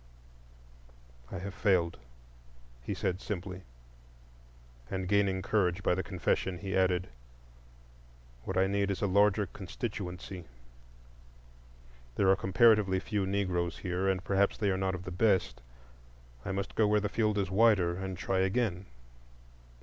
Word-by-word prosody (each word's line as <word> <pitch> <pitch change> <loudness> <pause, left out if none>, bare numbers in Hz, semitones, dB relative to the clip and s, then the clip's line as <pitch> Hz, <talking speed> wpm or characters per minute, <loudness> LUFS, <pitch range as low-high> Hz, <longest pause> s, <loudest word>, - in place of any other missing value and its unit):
"I - - -4
have 95 +2 -6
failed," 90 -7 +1 0.8
he 60 - -4
said 90 +2 -2
simply. 95 -2 -5 1.3
And 95 -1 -3
gaining 100 -1 +2
courage 100 -3 +1
by - - +3
the 90 - -1
confession, 95 -1 -1
he 95 0 -4
added: 95 -1 +1 1.3
"What - - -3
I 95 - +4
need 100 0 0
is 100 - -2
a - - +4
larger 100 +1 +3
constituency. 95 -2 -6 1.7
There 95 - +3
are - - +5
comparatively 100 -1 +4
few 100 -1 -2
Negroes 90 -3 -1
here, 90 0 -2
and 95 -1 -1
perhaps 100 0 +1
they 105 -3 +1
are - - +1
not 95 0 -1
of 90 - -7
the 90 - -6
best. 90 - +1 0.8
I - - -3
must 100 +1 -3
go 110 - +3
where 105 0 +3
the 105 - -1
field 105 0 0
is 95 -2 -1
wider, 95 -4 +4
and 95 0 -5
try 95 +2 -1
again." 95 -1 0
95 Hz, 140 wpm, -31 LUFS, 90-100 Hz, 1.7 s, are